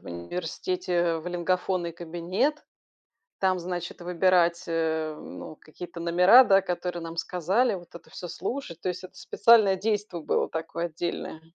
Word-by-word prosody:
в - - -25
университете 175 - -2
в 160 - -10
лингафонный 180 0 -1
кабинет, 175 - -2 0.8
там, 185 -1 +2
значит, 175 0 -5
выбирать, 175 -1 +2
э, 160 -1 -1
ну 90 - -9
какие-то 170 +2 -10
номера, 180 +9 +7
да, 195 0 +5
которые 180 -2 -3
нам 165 0 -7
сказали, 190 +8 +1
вот 175 -2 -11
это 170 - -12
всё 175 - -8
слушать. 240 - -5
То - - -3
есть, 180 +1 -5
это 185 - -11
специальное 220 -4 +5
действо 205 -3 -2
было - - 0
такое 165 +1 -3
отдельное. 165 -1 -4
175 Hz, 145 wpm, -27 LUFS, 170-190 Hz, 0.8 s, номера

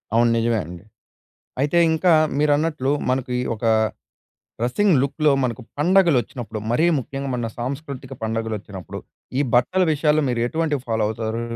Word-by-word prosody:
అవును 120 0 +4
నిజమేండి. 105 -7 -2 0.8
అయితే 150 +4 +1 0.2
ఇంకా 170 +2 +2 0.3
మీరన్నట్లు 150 -2 +1 0.2
మనకి 130 -1 -1 0.2
ఒక 110 - -14 1.0
డ్రెసింగ్ 175 - +2
లుక్‌లో 150 +2 +2
మనకు 125 -1 -2 0.2
పండుగలోచ్చినప్పుడు 145 - +2
మరీ 155 +8 +3
ముఖ్యంగా 135 0 -4
మన 120 -2 -2
సాంస్కృతిక 135 +1 -5
పండుగలోచ్చినప్పుడు, 110 -4 -4 0.4
ఈ - - +3
బట్టల 180 +10 +3
విషయాల్లో 150 0 +2
మీరు 120 -2 -1
ఎటువంటివి 150 -1 -1
ఫాలో 110 -1 0
అవుతారు? 110 +1 -3
130 Hz, 120 wpm, -22 LUFS, 115-150 Hz, 1.0 s, అవును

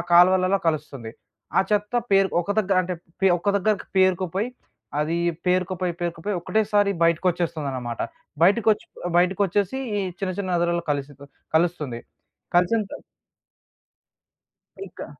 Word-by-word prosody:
కాాల్వలలో 185 +2 +5
కలుస్తుంది. 140 -7 -4 0.5
ఆ - - +7
చెత్త 210 +3 0 0.2
పేర్ 195 -1 +5
ఒక 175 +4 -2
దగ్గర 195 -2 +2
అంటే 180 0 -3 0.3
పే 195 - +4
ఒక 200 +4 0
దగ్గరకి 210 +1 0
పేరుకోపోయి. 185 +3 +2 0.5
అది 155 +3 0 0.3
పేరుకపోయి, 185 0 0
పేరుకపోయి 175 +4 -3
ఒకటేసారి 205 +1 +2
బయటకొచ్చేస్తుందనమాట. 155 -8 -1 0.4
బయటకోచ్చి 210 +4 +3 0.3
బయటకోచ్చేసి 195 +5 +1 0.2
ఈ - - +1 0.2
చిన్న 190 -2 -1
చిన్న 195 -2 -2
నదులలో 170 0 0
కలిసి 145 0 -2 0.4
కలుస్తుంది. 155 -8 0 0.6
కల్సిన 180 +6 +3
త - - -7 1.8
ఇంకా - - -9
180 Hz, 110 wpm, -24 LUFS, 170-200 Hz, 1.8 s, ఆ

